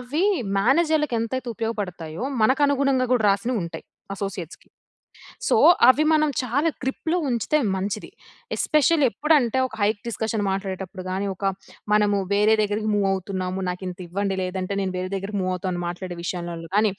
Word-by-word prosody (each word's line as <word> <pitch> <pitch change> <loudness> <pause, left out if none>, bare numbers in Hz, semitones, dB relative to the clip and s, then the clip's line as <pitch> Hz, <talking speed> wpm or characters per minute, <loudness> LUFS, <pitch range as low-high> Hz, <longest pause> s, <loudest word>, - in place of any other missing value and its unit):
అవి 290 +9 -1 0.3
మేనేజర్‌లకెంతైతే 260 -2 +1
ఉపయోగపడతాయో, 195 -5 -4 0.2
మనకనుగుణంగా 275 0 +3
గూడా 230 -4 +2
రాసినవుంటాయి. 195 -5 -2 0.3
అసోసియేట్స్‌కి. 195 -4 -6 0.8
సో, - - +3 0.3
అవి 275 +4 +5
మనం 305 -1 +3
చాలా 270 +6 +1
గ్రిప్‌లో 300 +6 -1
ఉంచితే 240 +5 +1 0.2
మంచిది. 200 +2 -3 0.5
ఎస్పెషల్లీ 305 -1 +3
ఎప్పుడంటే 280 -1 +2
ఒక 235 - -11
హైక్ 205 0 +1
డిస్కషన్ 220 -1 -2
మాట్లాడేటప్పుడు 190 -1 -4
గాని, 190 +2 -2
ఒక 195 - -5 0.5
మనము 210 -1 +3 0.2
వేరే 210 +2 +4
దెగ్గరికి 210 +1 -1
మూవ్ 200 -1 +2
అవుతున్నాము, 185 -1 -3
నాకింతివ్వండి, 185 +2 -3
లేదంటే 185 +1 -3
నేను 190 -1 -2
వేరే 185 0 -3
దెగ్గరికి 195 +1 -4
మూవ్ 185 0 -1
అవుతాను 180 -1 -3
మాట్లాడే 175 0 -5
విషయంలల్లో 170 -2 -5
గానీ 210 0 +4
205 Hz, 130 wpm, -24 LUFS, 185-255 Hz, 0.8 s, అవి